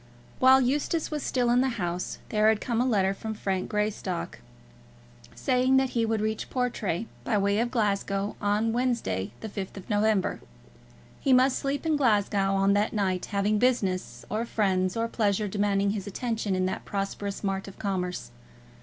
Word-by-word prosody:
While 260 Hz, +1 st, +7 dB
Eustace 295 Hz, +6 st, 0 dB
was 300 Hz, -1 st, -2 dB
still 245 Hz, -3 st, +1 dB
in 245 Hz, +1 st, +4 dB
the 265 Hz, -, +2 dB
house, 175 Hz, -1 st, -3 dB
there 215 Hz, 0 st, +4 dB
had 220 Hz, -1 st, +2 dB
come 235 Hz, 0 st, -1 dB
a 255 Hz, -, +1 dB
letter 195 Hz, -5 st, +2 dB
from 220 Hz, +2 st, -5 dB
Frank 190 Hz, -3 st, -2 dB
Greystock, 210 Hz, -4 st, -2 dB, 1.0 s
saying 260 Hz, 0 st, +2 dB
that 265 Hz, -1 st, +2 dB
he 230 Hz, -2 st, +1 dB
would 220 Hz, -1 st, 0 dB
reach 220 Hz, 0 st, -2 dB
Portray, 230 Hz, -7 st, -1 dB, 0.2 s
by 220 Hz, -, +1 dB
way 200 Hz, +1 st, +2 dB
of 240 Hz, +1 st, +1 dB
Glasgow, 200 Hz, -3 st, 0 dB
on 210 Hz, +2 st, +1 dB
Wednesday, 230 Hz, -, -1 dB
the -, -, -4 dB
5th 195 Hz, -2 st, -6 dB
of 195 Hz, -, -9 dB
November. 210 Hz, -1 st, +1 dB, 0.8 s
He 270 Hz, -, +3 dB
must 255 Hz, +1 st, +4 dB
sleep 280 Hz, +3 st, -2 dB
in 315 Hz, -2 st, +2 dB
Glasgow 205 Hz, -6 st, +2 dB
on 195 Hz, +1 st, +3 dB
that 205 Hz, +1 st, +1 dB
night, 190 Hz, -4 st, 0 dB
having 205 Hz, +1 st, +1 dB
business, 185 Hz, -, 0 dB
or 215 Hz, +2 st, -1 dB
friends, 190 Hz, -4 st, 0 dB
or 230 Hz, 0 st, 0 dB
pleasure 210 Hz, -2 st, 0 dB
demanding 200 Hz, 0 st, +1 dB
his 205 Hz, -2 st, -4 dB
attention 220 Hz, -2 st, -2 dB
in 185 Hz, 0 st, +1 dB
that 185 Hz, -, -3 dB
prosperous 200 Hz, 0 st, -4 dB
mart 195 Hz, -1 st, -2 dB
of 195 Hz, -, -11 dB
commerce. 180 Hz, -, -3 dB
210 Hz, 170 wpm, -27 LUFS, 195-240 Hz, 1.0 s, While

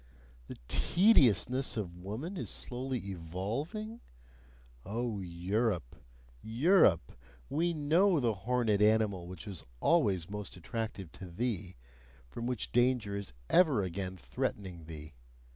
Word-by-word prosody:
The -, -, -8 dB
tediousness 135 Hz, -, +4 dB
of 90 Hz, -5 st, -3 dB
woman 110 Hz, -, -5 dB
is -, -, -4 dB
slowly 130 Hz, +1 st, -3 dB
evolving? 115 Hz, -, -4 dB, 0.8 s
Oh 115 Hz, +1 st, -2 dB
Europe! 90 Hz, -, -1 dB, 0.5 s
Europe! 115 Hz, -, +4 dB, 0.4 s
We 170 Hz, +3 st, +1 dB
know 165 Hz, +4 st, +3 dB
the 120 Hz, -4 st, +2 dB
horned 115 Hz, +3 st, 0 dB
animal 105 Hz, -4 st, +3 dB
which 90 Hz, -3 st, -8 dB
was 95 Hz, -5 st, -6 dB, 0.2 s
always 100 Hz, -, +3 dB
most 105 Hz, -2 st, -6 dB
attractive 105 Hz, -2 st, -5 dB
to 95 Hz, -, -9 dB
thee, 95 Hz, -1 st, -3 dB, 0.5 s
from 115 Hz, -, -5 dB
which 125 Hz, -3 st, -2 dB
danger 120 Hz, -4 st, +2 dB
is 100 Hz, -8 st, -5 dB
ever 150 Hz, -, +4 dB
again 95 Hz, +1 st, -4 dB
threatening 85 Hz, -, -4 dB
thee! 75 Hz, -1 st, -9 dB
110 Hz, 115 wpm, -32 LUFS, 90-130 Hz, 0.8 s, tediousness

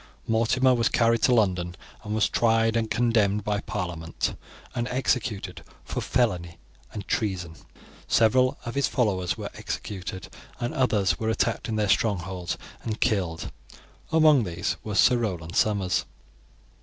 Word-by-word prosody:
Mortimer 115 Hz, +3 st, +3 dB
was 120 Hz, -2 st, +2 dB
carried 115 Hz, -1 st, +2 dB
to 125 Hz, -, +4 dB
London, 90 Hz, -5 st, +1 dB, 0.3 s
and 105 Hz, 0 st, -3 dB
was 110 Hz, -, +3 dB
tried 115 Hz, -1 st, +2 dB
and 115 Hz, -1 st, 0 dB
condemned 110 Hz, -4 st, +2 dB
by 105 Hz, 0 st, 0 dB
parliament, 85 Hz, -5 st, -3 dB, 0.4 s
and 120 Hz, 0 st, -2 dB
executed 110 Hz, -7 st, -1 dB, 0.2 s
for -, -, -3 dB
felony 90 Hz, -9 st, 0 dB, 0.3 s
and 100 Hz, -2 st, -7 dB
treason. 95 Hz, -6 st, -1 dB, 0.5 s
Several 125 Hz, +3 st, +3 dB
of 120 Hz, -, -4 dB
his 140 Hz, -1 st, +1 dB
followers 95 Hz, -8 st, 0 dB
were -, -, -6 dB
executed, 95 Hz, -2 st, -6 dB, 0.3 s
and 120 Hz, 0 st, -2 dB
others 105 Hz, -7 st, +1 dB
were 110 Hz, -, -1 dB
attacked 110 Hz, +1 st, 0 dB
in 110 Hz, -, -1 dB
their 105 Hz, -1 st, +1 dB
strongholds 95 Hz, -4 st, 0 dB, 0.2 s
and 110 Hz, -2 st, -4 dB
killed; 95 Hz, -8 st, 0 dB, 0.6 s
among 155 Hz, -5 st, +5 dB
these 85 Hz, -3 st, -2 dB
was 105 Hz, -2 st, -1 dB
Sir 125 Hz, -, +6 dB
Roland 90 Hz, -7 st, -3 dB
Somers. 100 Hz, -5 st, +1 dB
105 Hz, 140 wpm, -26 LUFS, 95-115 Hz, 0.6 s, Sir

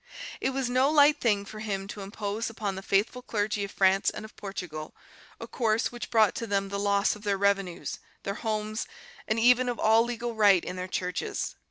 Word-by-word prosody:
It -, -, 0 dB
was 265 Hz, -1 st, -1 dB
no 255 Hz, +3 st, +3 dB
light 295 Hz, -1 st, +5 dB
thing 205 Hz, -4 st, +2 dB
for 215 Hz, +2 st, -9 dB
him 195 Hz, -3 st, -3 dB
to 205 Hz, -, -7 dB
impose 205 Hz, +3 st, -3 dB
upon 215 Hz, -3 st, -3 dB
the 190 Hz, -, -6 dB
faithful 205 Hz, +6 st, +1 dB
clergy 210 Hz, -3 st, -1 dB
of -, -, -8 dB
France 195 Hz, 0 st, +3 dB
and -, -, -7 dB
of 220 Hz, -, -14 dB
Portugal 175 Hz, -6 st, -7 dB, 0.4 s
a -, -, -6 dB
course 225 Hz, 0 st, 0 dB
which 240 Hz, -1 st, -7 dB
brought 220 Hz, -5 st, +4 dB
to 230 Hz, -, -4 dB
them 195 Hz, -1 st, 0 dB
the 200 Hz, 0 st, -3 dB
loss 200 Hz, 0 st, +2 dB
of 210 Hz, -, -12 dB
their 200 Hz, -2 st, 0 dB
revenues, 195 Hz, -3 st, 0 dB, 0.2 s
their 200 Hz, -, -2 dB
homes, 215 Hz, 0 st, -3 dB, 0.4 s
and 220 Hz, +1 st, +1 dB
even 250 Hz, +2 st, +5 dB
of 240 Hz, -, -2 dB
all 220 Hz, +1 st, +5 dB
legal 240 Hz, 0 st, -3 dB
right 205 Hz, -5 st, +5 dB
in -, -, -5 dB
their 180 Hz, 0 st, -4 dB
churches. 180 Hz, -1 st, -3 dB
210 Hz, 205 wpm, -28 LUFS, 195-230 Hz, 0.4 s, light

